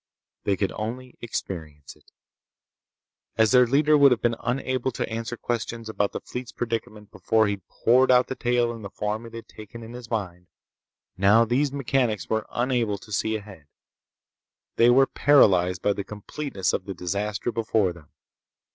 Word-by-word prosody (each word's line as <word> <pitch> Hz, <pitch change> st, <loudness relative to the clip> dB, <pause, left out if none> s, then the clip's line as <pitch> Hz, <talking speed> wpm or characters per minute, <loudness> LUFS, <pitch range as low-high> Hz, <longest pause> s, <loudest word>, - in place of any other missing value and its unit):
They 100 Hz, -1 st, +1 dB
could 100 Hz, -, -1 dB
only 125 Hz, +4 st, -6 dB
experience 80 Hz, -10 st, -6 dB
it. -, -, -26 dB, 1.3 s
As 110 Hz, -1 st, +4 dB
their 125 Hz, -1 st, +6 dB
leader 150 Hz, +4 st, +4 dB
would 140 Hz, -1 st, +7 dB
have 120 Hz, -, +1 dB
been 120 Hz, -, +2 dB
unable 130 Hz, +1 st, -1 dB
to -, -, -3 dB
answer 115 Hz, +1 st, -4 dB
questions 115 Hz, -1 st, -4 dB
about 105 Hz, -2 st, -1 dB
the -, -, -4 dB
fleet's 125 Hz, -2 st, -7 dB
predicament 115 Hz, -2 st, -5 dB
before 110 Hz, +2 st, +2 dB
he'd 100 Hz, -3 st, -4 dB
poured 130 Hz, +3 st, +3 dB
out 125 Hz, -1 st, +5 dB
the -, -, -4 dB
tale 120 Hz, -2 st, +1 dB
in 115 Hz, -, -9 dB
the 100 Hz, -, -7 dB
form 105 Hz, +3 st, -4 dB
it 115 Hz, -, -12 dB
had 115 Hz, -, -9 dB
taken 110 Hz, +2 st, -11 dB
in 115 Hz, +1 st, -10 dB
his 120 Hz, -2 st, -9 dB
mind, 90 Hz, -6 st, -4 dB, 0.7 s
now 105 Hz, +5 st, +5 dB
these 130 Hz, +5 st, +1 dB
mechanics 130 Hz, -6 st, 0 dB
were 110 Hz, 0 st, 0 dB
unable 120 Hz, -4 st, 0 dB
to 105 Hz, -, -15 dB
see 110 Hz, +2 st, 0 dB
ahead. 100 Hz, -8 st, -9 dB, 1.1 s
They 115 Hz, +1 st, +5 dB
were 135 Hz, +2 st, +6 dB
paralyzed 90 Hz, -13 st, +3 dB
by 105 Hz, -, +3 dB
the 100 Hz, -, -4 dB
completeness 105 Hz, -, -4 dB
of 90 Hz, -, -2 dB
the 95 Hz, -, -6 dB
disaster 100 Hz, +6 st, -2 dB
before 110 Hz, -5 st, 0 dB
them. 80 Hz, -4 st, -17 dB
115 Hz, 170 wpm, -25 LUFS, 100-120 Hz, 1.3 s, would